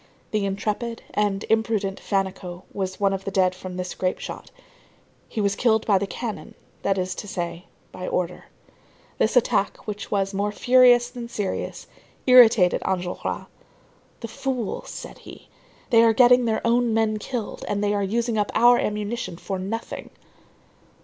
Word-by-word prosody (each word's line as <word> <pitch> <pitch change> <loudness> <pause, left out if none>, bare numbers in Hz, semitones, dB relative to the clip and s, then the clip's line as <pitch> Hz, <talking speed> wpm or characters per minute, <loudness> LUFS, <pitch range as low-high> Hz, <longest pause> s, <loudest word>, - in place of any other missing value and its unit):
The 210 -2 0
intrepid 215 +4 -3
and 205 -1 0
imprudent 220 -3 0
Fannicot 190 -2 -3
was 190 -1 -3
one 200 -1 +2
of 195 0 -4
the - - -3
dead 185 -1 +2
from 185 0 -8
this 180 0 -4
grape 185 0 -1
shot. - - -8 0.8
He - - -4
was 200 -1 +1
killed 220 -1 +2
by 200 -3 +4
the 200 - -2
cannon, 225 +1 -6 0.3
that 195 -1 +1
is 185 0 -1
to 205 - -7
say, 175 -2 -4 0.3
by 185 - -6
order. 180 0 -2 0.7
This 220 - +2
attack, 220 -4 +1
which 210 -1 -5
was 195 -1 0
more 200 +1 0
furious 245 +1 +5
than 240 -2 -7
serious, 205 -5 -4 0.4
irritated 235 -8 +6
Enjolras.—"The 185 +5 -6
fools!" 250 -2 -4
said - - -8
he. - - -13 0.4
"They 230 -1 +7
are 230 -1 +5
getting 250 +1 +6
their 225 0 -1
own 235 -1 +2
men 220 -1 +1
killed 235 0 -5
and 205 0 -1
they 205 0 +1
are 205 - 0
using 225 +3 0
up 205 - 0
our 240 +1 +6
ammunition 210 -3 -3
for 190 +1 -4
nothing." 210 +5 -5
205 Hz, 155 wpm, -24 LUFS, 190-230 Hz, 0.8 s, They